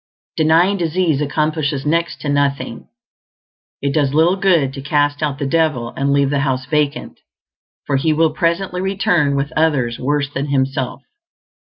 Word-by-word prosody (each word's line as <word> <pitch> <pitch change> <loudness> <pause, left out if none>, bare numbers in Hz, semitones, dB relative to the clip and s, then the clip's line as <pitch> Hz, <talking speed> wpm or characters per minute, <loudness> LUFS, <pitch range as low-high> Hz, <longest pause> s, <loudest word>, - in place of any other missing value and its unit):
Denying 165 +5 +3
disease 165 -3 0
accomplishes 150 -1 -1
next 165 +2 -1
to 145 - -3
nothing; 140 -1 -1 1.0
it 140 0 0
does 145 -2 +1
little 165 +4 +4
good 170 -9 +2
to 135 - -7
cast 145 +1 0
out 145 -3 -1
the 140 - -3
devil 150 -5 0
and 140 +1 0
leave 140 -1 +2
the 140 - +1
house 130 -2 -1
vacant, 145 +1 -2 0.7
for 140 - 0
he 155 +4 +1
will 160 +1 +2
presently 170 +3 -1
return 180 -7 +1
with 140 +1 -2
others 140 -7 +1
worse 145 +1 -1
than 140 +2 -2
himself. 135 -1 -1
145 Hz, 155 wpm, -18 LUFS, 140-160 Hz, 1.0 s, little